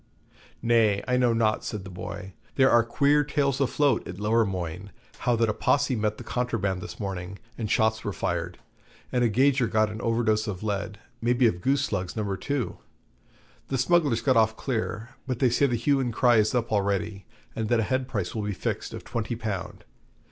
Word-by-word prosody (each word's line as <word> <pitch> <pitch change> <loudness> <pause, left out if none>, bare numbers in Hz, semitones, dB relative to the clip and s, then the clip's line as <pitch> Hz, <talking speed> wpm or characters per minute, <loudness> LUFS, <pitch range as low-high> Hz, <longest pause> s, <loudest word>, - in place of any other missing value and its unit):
'Nay, 115 -4 +3
I 125 - +2
know 125 -1 +3
not,' 115 -2 +1
says 105 -3 -4
the 95 - -9
boy; 95 +1 -7 0.2
'there 135 -1 +5
are 120 0 +6
queer 140 +5 +3
tales 140 -2 0
afloat 140 -1 +2
at 90 +1 -7
Lowermoigne, 100 -5 0 0.3
how 120 - +2
that 115 0 +2
a 105 - +1
Posse 135 +3 +1
met 105 -1 -1
the - - -8
Contraband 105 -7 -1
this 105 - -8
morning, 95 -1 -5 0.2
and 110 -3 -4
shots 110 +1 +2
were 105 - -2
fired, 85 0 -3 0.5
and 125 -1 +1
a 120 - +3
gauger 130 +2 +3
got 110 0 +2
an 110 - -6
overdose 115 -2 +1
of 100 -1 -4
lead 105 0 -2 0.2
maybe 120 +2 +3
of 90 -6 +1
goose 140 +4 +2
slugs 90 -6 -3
No. 105 -3 -2
2. 140 +4 -3 0.9
The 135 - -1
smugglers 140 -3 +2
got 130 0 +3
off 110 0 +3
clear, 115 -3 -3 0.2
but 130 -3 -1
they 125 -1 +3
say 140 +4 +3
the 120 - 0
hue 135 +4 +2
and 125 -3 -1
cry 120 +1 +4
is 110 +2 +2
up 120 -1 0
already, 100 -1 -1 0.3
and 110 -1 -2
that 120 - +3
a - - +2
head 130 +4 -1
price 100 -9 -3
will 110 - -2
be 105 0 -2
fixed - - -3
of - - -8
twenty 115 0 -3
pound. 105 -5 -5
110 Hz, 200 wpm, -26 LUFS, 105-125 Hz, 0.9 s, are